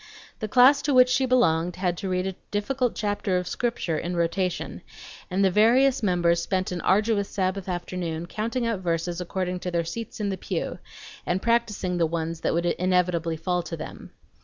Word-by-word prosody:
The 215 - -3
class 260 +5 +6
to 280 -1 +1
which 255 0 +7
she 255 +1 +2
belonged 175 -9 +2
had 180 -1 -1
to 195 - -3
read 185 0 0
a 190 - -2 0.2
difficult 245 +4 -1
chapter 205 -3 -1
of 180 -1 -3
Scripture 230 -11 -1
in 175 +1 -3
rotation, 175 +1 -1 0.5
and 195 +1 +2
the 190 - +3
various 250 +7 +4
members 175 -4 +2
spent 185 +1 -1
an 175 -2 -3
arduous 205 +1 +2
Sabbath 190 -1 -2
afternoon 175 -2 -3
counting 230 +6 -2
out 230 -4 -1
verses 170 0 -2
according 180 0 -3
to 180 - -4
their 170 -1 -1
seats 225 +8 -6
in 205 -1 -1
the 190 - -2
pew, - - -3 0.4
and 175 +1 0
practicing 210 -6 0
the 165 - +3
ones 165 0 -3
that - - 0
would 170 +1 0
inevitably 175 -2 +1
fall 180 +2 -1
to 165 0 -6
them. 155 - -8
185 Hz, 185 wpm, -25 LUFS, 175-215 Hz, 0.5 s, which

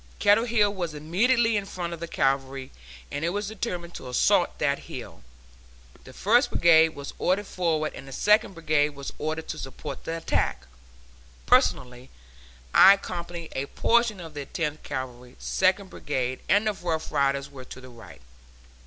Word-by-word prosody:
Kettle 210 +3 +4
Hill 215 -4 +2
was 175 -5 -4
immediately 230 - +2
in 205 -1 -1
front 175 -3 -5
of 170 - -7
the 170 - -5
Cavalry, 135 -2 -1 0.4
and 145 - -4
it 170 - +1
was 205 +3 -3
determined 180 -6 -5
to 130 - -8
assault 125 - +2
that - - 0
hill. - - -8 0.8
The 130 - -11
First 230 - +3
Brigade 160 -1 +5
was 140 -1 -7
ordered 195 +3 +1
forward, 160 -5 -1
and 135 - -10
the - - -10
Second 210 - +2
Brigade 150 -3 +1
was 140 0 -7
ordered 155 +1 -3
to 155 - -4
support 135 +1 -7
the 165 - -3
attack; 65 - -1 0.8
personally, 125 - +2 0.6
I 195 - +9
accompanied 170 -3 -7
a 135 +1 -2
portion 235 +1 +2
of 165 -3 -9
the 145 -2 -6
Tenth 155 -3 -3
Cavalry, 125 -1 -6
Second 190 +1 +1
Brigade, 130 -3 -3
and 205 +3 +4
the 215 - +1
Rough 165 -4 -3
Riders 140 -1 0
were 130 -2 -10
to 130 - -10
the 130 0 -12
right. 115 - -14
160 Hz, 165 wpm, -26 LUFS, 140-195 Hz, 0.8 s, I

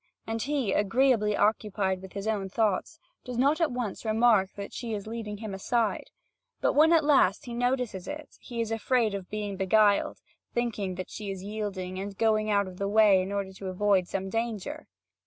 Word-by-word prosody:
And 225 0 -3
he, 265 -6 0
agreeably 210 0 +2
occupied 205 -3 +1
with 190 -1 -11
his 200 0 -5
own 200 -3 -1
thoughts, 220 - 0 0.3
does 250 -2 -6
not 285 +6 +3
at 320 -4 +2
once 245 -5 -4
remark 220 -3 +3
that 200 0 -7
she 230 -3 -4
is 200 - -6
leading 220 -2 -5
him 215 -1 -6
aside; 220 +3 -1 0.5
but - - +2
when 310 +3 +5
at 330 -2 +5
last 290 0 +3
he 240 - -6
notices 245 -5 -1
it, 300 0 -7
he 235 -2 -5
is 225 -1 -3
afraid 225 -1 +1
of 195 -2 -5
being 205 -2 -4
beguiled, 205 +2 +3 0.4
thinking 215 -6 -1
that 185 0 -6
she 210 -2 -6
is 190 -1 -5
yielding 195 -3 -4
and 195 - -3
is 200 - -9
going 215 0 +2
out 200 -1 +3
of 185 -1 -10
the 200 - -1
way 205 -3 +5
in 190 +2 -4
order 200 -1 -3
to 195 0 -8
avoid 185 -1 +2
some 195 +1 -3
danger. 230 +7 -3
210 Hz, 195 wpm, -28 LUFS, 195-235 Hz, 0.5 s, when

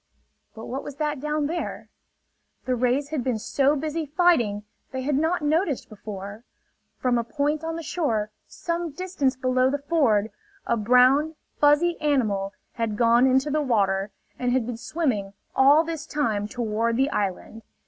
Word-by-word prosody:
But 225 - -8
what 265 +3 -4
was 290 - -8
that 300 -1 -2
down 300 +1 -1
there? 335 +4 -4 0.8
The 255 - 0
rays 255 +4 0
had 300 -5 -2
been 250 -3 0
so 275 +6 +1
busy 310 +3 -2
fighting 280 - +2 0.3
they 260 -1 -4
had 290 +3 0
not 320 +3 +1
noticed 310 -1 0
before. 205 0 -8 0.5
From 245 -2 +1
a - - -1
point 295 +5 -1
on 325 0 -3
the 330 - -5
shore 225 -11 -1 0.2
some 340 0 -3
distance 295 -5 -1
below 255 0 +2
the 285 - 0
ford 275 -9 +1 0.3
a - - +1
brown, 250 +7 +4 0.2
fuzzy 300 +4 +3
animal 215 -10 +1 0.2
had 225 -3 -2
gone 235 +2 +5
into 265 +3 +2
the 305 +1 +1
water, 200 -7 +1 0.3
and 250 -1 0
had 250 -2 +1
been 240 -1 -5
swimming 230 -9 -2 0.2
all 285 +4 +6
this 325 -2 -5
time 220 -10 -1
toward 230 0 -1
the 270 +3 +2
island. 205 +3 -3
265 Hz, 160 wpm, -25 LUFS, 230-300 Hz, 0.8 s, all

